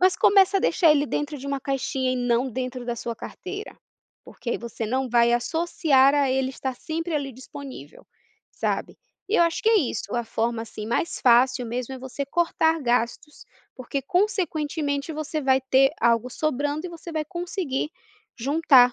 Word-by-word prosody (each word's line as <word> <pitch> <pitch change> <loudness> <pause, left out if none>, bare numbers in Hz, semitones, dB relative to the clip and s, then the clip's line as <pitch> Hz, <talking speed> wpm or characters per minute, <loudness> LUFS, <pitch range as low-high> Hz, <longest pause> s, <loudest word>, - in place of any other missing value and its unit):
Mas 370 0 +5
começa 390 0 +5
a - - -3
deixar 335 -6 +4
ele 290 0 +2
dentro 295 +1 -3
de 275 - -8
uma 280 0 -1
caixinha 265 -1 -1
e - - -1
não 245 +1 +1
dentro 255 0 -4
da 240 - -2
sua 230 -1 -5
carteira, 400 +3 -8 0.5
porque 240 - -7
aí - - -1
você 235 -1 -5
não 260 +3 -1
vai 235 0 +4
associar 275 +1 +3
a 280 -2 +2
ele 260 0 +1
estar 260 -1 -4
sempre 330 +3 -4
ali 275 -3 -2
disponível, 260 - -10 0.5
sabe. - - -2 0.3
E 440 - +2
eu - - +6
acho 335 -1 0
que 445 - +4
é 440 - +6
isso, 225 - -2
a 240 - +1
forma, 225 +1 -1
assim, 215 -1 -8
mais 285 +9 -1
fácil 250 +1 +4
mesmo 250 +3 -4
é - - -8
você 265 +2 -5
cortar 325 0 +1
gastos, 240 +4 -1 0.3
porque 265 +2 -4
consequentemente 310 -4 -1
você 310 0 -3
vai 265 -1 +3
ter 265 +1 +4
algo 235 +1 +3
sobrando 290 +3 -1
e - - -8
você 335 0 -9
vai 310 -1 -1
conseguir 345 -4 -3 0.5
juntar 270 -1 +5
270 Hz, 180 wpm, -25 LUFS, 245-320 Hz, 0.5 s, eu